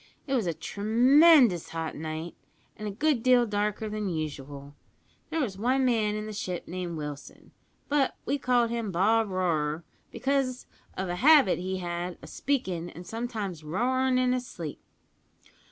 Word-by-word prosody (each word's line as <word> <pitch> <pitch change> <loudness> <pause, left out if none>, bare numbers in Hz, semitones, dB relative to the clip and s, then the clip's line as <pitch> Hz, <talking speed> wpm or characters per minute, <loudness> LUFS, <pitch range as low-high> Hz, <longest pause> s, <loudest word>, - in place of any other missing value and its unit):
It 275 - -3
was 235 -8 +1
a 170 - 0
tremendous 245 - +4
hot 165 -1 -4
night, 160 +2 -5 0.4
an' 215 - -6
a - - -3
good 275 +4 +1
deal 250 0 +5
darker 210 0 -1
than 210 -1 -3
usual. 145 -3 -5 0.6
There 320 0 -2
was 200 -8 -3
one 260 +4 +2
man 220 -4 +1
in 215 0 -4
the 215 - -6
ship 180 -4 -4
named 175 -2 -4
Wilson; 150 -2 -8 0.4
but 285 -2 +1
we 280 +2 0
called 245 -2 +2
him 230 -4 -2
Bob 215 +5 +2
Roarer, 165 -4 -1 0.3
because 270 -2 -1 0.3
of 190 0 -2
a 175 0 -3
habit 275 - +6
he 190 +1 -3
had 175 0 -4
of - - -10
speakin' 185 -12 -2
an' 175 - -10
sometimes 215 -6 -5
roarin' 255 +10 +1
in 255 0 +2
his 250 -1 -2
sleep. 160 -4 -7
210 Hz, 160 wpm, -28 LUFS, 175-250 Hz, 0.6 s, habit